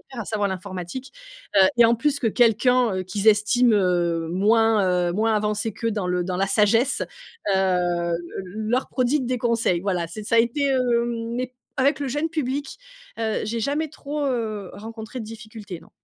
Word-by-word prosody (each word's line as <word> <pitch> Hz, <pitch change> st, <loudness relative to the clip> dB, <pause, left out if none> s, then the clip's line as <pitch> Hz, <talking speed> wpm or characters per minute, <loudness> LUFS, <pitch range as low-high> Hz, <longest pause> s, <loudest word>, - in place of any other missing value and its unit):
de -, -, -27 dB
faire, 240 Hz, -3 st, -4 dB
à -, -, -10 dB
savoir 205 Hz, -1 st, -1 dB
l'informatique. 190 Hz, +6 st, -6 dB, 0.4 s
Heu 190 Hz, -, +7 dB
et 240 Hz, -, +7 dB
en 230 Hz, +1 st, +5 dB
plus 285 Hz, +5 st, 0 dB
que 240 Hz, -, 0 dB
quelqu'un, 240 Hz, -1 st, +3 dB
heu, 185 Hz, -, -1 dB
qu'ils 200 Hz, +3 st, 0 dB
estiment, 220 Hz, +3 st, +4 dB
heu, 175 Hz, -4 st, +1 dB
moins, 200 Hz, -2 st, +3 dB
heu, -, -, -1 dB
moins 220 Hz, +4 st, +1 dB
avancé 210 Hz, +1 st, -1 dB
qu'eux 230 Hz, +3 st, -2 dB
dans 205 Hz, -4 st, -2 dB
le 180 Hz, -1 st, 0 dB
dans 185 Hz, 0 st, -3 dB
la 195 Hz, +2 st, +1 dB
sagesse. 220 Hz, +6 st, +2 dB, 0.5 s
Hem, 175 Hz, -2 st, +1 dB, 0.3 s
le 215 Hz, +4 st, -5 dB
leur 255 Hz, +2 st, +1 dB
prodigue 255 Hz, +1 st, 0 dB
des 250 Hz, 0 st, -1 dB
conseils. 230 Hz, -7 st, +1 dB
Voilà, 180 Hz, -3 st, -1 dB
c'est 205 Hz, +6 st, -8 dB
ça 230 Hz, -, +1 dB
a -, -, +6 dB
été 235 Hz, +5 st, +2 dB
hem, 235 Hz, -3 st, 0 dB
mais 255 Hz, 0 st, -4 dB, 0.2 s
avec 275 Hz, +2 st, +2 dB
le 280 Hz, -, -2 dB
jeune 295 Hz, +5 st, -1 dB
public, 285 Hz, -3 st, -3 dB, 0.4 s
heu, 220 Hz, -1 st, -1 dB
j'ai 230 Hz, +2 st, -3 dB
jamais 295 Hz, +6 st, -1 dB
trop, 290 Hz, 0 st, -5 dB
heu, 220 Hz, -7 st, -2 dB
rencontré 220 Hz, +3 st, -8 dB
de 220 Hz, -, -5 dB
difficultés, 220 Hz, -4 st, -9 dB
non. -, -, -19 dB
220 Hz, 190 wpm, -23 LUFS, 195-245 Hz, 0.5 s, Heu